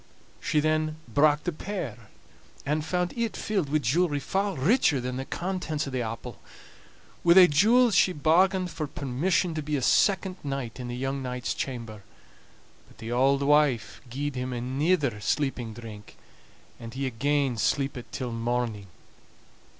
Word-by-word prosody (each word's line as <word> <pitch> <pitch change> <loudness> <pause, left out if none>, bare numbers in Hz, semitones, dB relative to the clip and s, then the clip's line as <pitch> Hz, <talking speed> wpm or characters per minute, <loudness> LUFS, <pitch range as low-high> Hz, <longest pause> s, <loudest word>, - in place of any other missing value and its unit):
She 155 - +1
then 155 0 +1
brak 145 +5 +3
the 175 - -1
pear, 150 - -6 0.6
and 150 +2 0
found 180 +2 -1
it 235 -2 -2
filled 195 -9 -1
wi' 155 - +2
jewelry 145 +3 +1
far 195 +7 -1
richer 150 - +3
than 125 +1 -4
the 135 - -4
contents 170 -5 -3
o' - - -5
the 130 -1 -1
apple. 115 0 -6 0.8
Wi' 170 0 +6
thae 190 -1 +10
jewels 220 +10 +4
she 185 +1 +4
bargained 180 +4 +2
for 155 -1 -4
permission 155 +7 0
to 155 - -3
be 150 0 -2
a 140 - -1
second 190 - +2
night 135 -4 -4
in 125 - -5
the 120 - -4
young 135 +1 -2
knight's 125 -1 -3
chamber; 115 -5 -5 0.9
but - - -21
the 115 +1 -7
auld 135 +3 +3
wife 145 -4 +2
gied 145 +4 -3
him 125 0 -3
anither 130 - 0
sleeping 130 -3 -1
drink, 110 -3 -11 0.6
and 115 0 -9
he 135 +1 -2
again 135 +1 0
sleepit 135 +2 -1
till 125 -3 -4
morning. 115 -3 -2
140 Hz, 155 wpm, -27 LUFS, 125-170 Hz, 0.9 s, thae